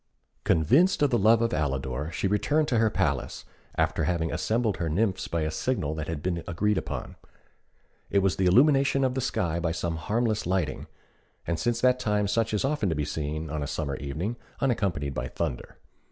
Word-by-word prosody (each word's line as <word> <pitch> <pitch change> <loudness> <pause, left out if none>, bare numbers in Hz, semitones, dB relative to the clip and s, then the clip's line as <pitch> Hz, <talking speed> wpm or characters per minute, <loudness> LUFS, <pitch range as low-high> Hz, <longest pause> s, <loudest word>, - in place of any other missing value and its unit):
Convinced 145 - +4
of 145 - +3
the 120 - +3
love 110 +3 +5
of 115 - 0
Alidor, 70 0 -2
she - - -3
returned 150 +10 +1
to 120 - +2
her 110 -1 +4
palace, - - -1 0.3
after 85 - +1
having 85 -1 0
assembled 110 +7 0
her 85 - -2
nymphs 95 +3 0
by 85 0 -1
a 80 0 -1
signal 80 - -1
that 80 -1 -4
had 80 -3 -4
been 85 -2 -1
agreed 105 +5 +1
upon. - - -6 0.9
It - - +1
was 95 - +1
the 95 - +2
illumination 135 +5 +4
of 130 -1 +1
the 130 - -1
sky 85 -9 -1
by 85 -1 -1
some 85 0 -2
harmless 110 +4 -1
lightning, 90 -8 -1 0.6
and 85 -1 -1
since 120 -1 0
that 125 0 +4
time 105 -3 +1
such 110 +2 +1
is 105 +3 0
often 135 -8 0
to 80 - 0
be 75 0 -1
seen 75 +1 -4
on 75 -1 -2
a 70 - -2
summer 70 -2 -3
evening, 80 +12 -4 0.2
unaccompanied 95 - 0
by - - -3
thunder. 65 0 -4
90 Hz, 195 wpm, -27 LUFS, 80-115 Hz, 0.9 s, love